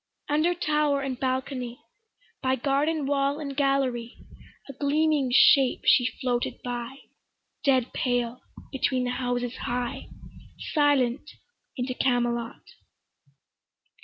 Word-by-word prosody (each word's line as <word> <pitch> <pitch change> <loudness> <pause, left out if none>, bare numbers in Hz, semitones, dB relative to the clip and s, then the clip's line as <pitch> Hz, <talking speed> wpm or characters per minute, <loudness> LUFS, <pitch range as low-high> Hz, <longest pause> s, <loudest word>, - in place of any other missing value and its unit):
Under 310 +4 +2
tower 300 -4 +1
and 265 -2 -4
balcony, 255 -1 -3 0.6
By 260 0 +1
garden 285 +4 0
wall 280 0 +1
and 280 -3 -5
gallery, 265 -4 0 0.5
A 275 - -8
gleaming 290 -1 +1
shape 265 0 +5
she 245 - +5
floated 245 -2 -1
by, 245 +2 -5 0.6
Dead 260 -4 +2
pale 245 -1 -1 0.3
between 260 -1 0
the 245 - -1
houses 245 -1 -2
high, 245 0 -3 0.7
Silent 290 -2 +2 0.5
into 255 0 -2
Camelot. 240 -2 -1
260 Hz, 105 wpm, -26 LUFS, 245-280 Hz, 0.7 s, shape